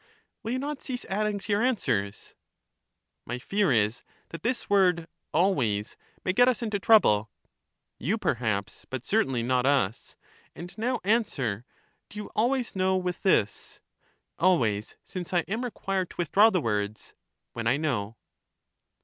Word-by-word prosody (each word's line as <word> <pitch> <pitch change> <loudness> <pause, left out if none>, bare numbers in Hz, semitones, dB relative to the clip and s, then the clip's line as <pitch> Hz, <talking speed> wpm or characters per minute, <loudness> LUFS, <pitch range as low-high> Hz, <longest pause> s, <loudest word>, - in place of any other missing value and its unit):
Will 225 +2 -3
you - - 0
not 285 +2 -4
cease 250 -2 -5
adding 210 +1 -1
to 205 +1 -6
your 205 +1 +2
answers? 110 - -1 0.9
My 120 - -4
fear 195 +7 +1
is 110 0 +2 0.3
that 165 - -8
this 240 +2 -1
word 180 -5 +3
" - - -54
always 125 - +1
" - - -35
may 185 - +1
get 245 +5 +5
us 250 -1 +1
into 215 -3 -1
trouble. 110 - +5 0.7
You, 190 - 0
perhaps, 110 - -2
but 130 -1 -5
certainly 135 - +1
not 125 +1 +1
us. 125 -7 0 0.4
And 175 +2 -9
now 245 +3 -1
an 225 +4 +3
swer: 120 - -3 0.4
Do 210 - -12
you 210 - -6
always 245 +1 +1
know 190 0 +2
with 180 -1 -3
this? 145 - +1 0.6
Always; 115 - +2
since 180 -1 -6
I 175 - +4
am 220 +8 -3
required 195 -6 -2
to - - -13
withdraw 190 +6 +5
the 185 -6 +1
words 105 -3 -2 0.2
" - - -55
when 115 -1 -3
I 125 +4 +3
know." 115 -8 -2
180 Hz, 160 wpm, -27 LUFS, -, 0.9 s, get